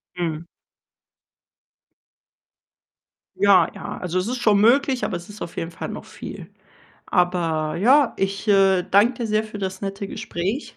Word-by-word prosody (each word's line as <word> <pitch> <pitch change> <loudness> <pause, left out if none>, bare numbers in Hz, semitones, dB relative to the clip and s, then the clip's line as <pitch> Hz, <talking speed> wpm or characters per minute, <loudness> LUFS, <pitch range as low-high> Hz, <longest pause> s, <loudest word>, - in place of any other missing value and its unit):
Mhm. 170 -1 -3 2.9
Ja, 195 -4 +5
ja, - - -7
also, 180 0 -3
es 185 +4 -1
ist 250 0 -3
schon 215 -4 +3
möglich, 260 +3 +3
aber 180 - -3
es 175 +3 -8
ist 205 - -7
auf 170 - -9
jeden 165 - -3
Fall 165 - -7
noch - - -7
viel. - - -9 0.6
Aber 165 -4 0
ja, 260 +8 +4
ich, 195 +2 -2
äh, 195 -2 +4
danke 200 +6 +3
dir 235 -1 -4
sehr 215 0 +1
für 215 -1 -9
das 190 -1 -4
nette 195 0 -4
Gespräch 195 - -4
195 Hz, 150 wpm, -22 LUFS, 175-215 Hz, 2.9 s, Ja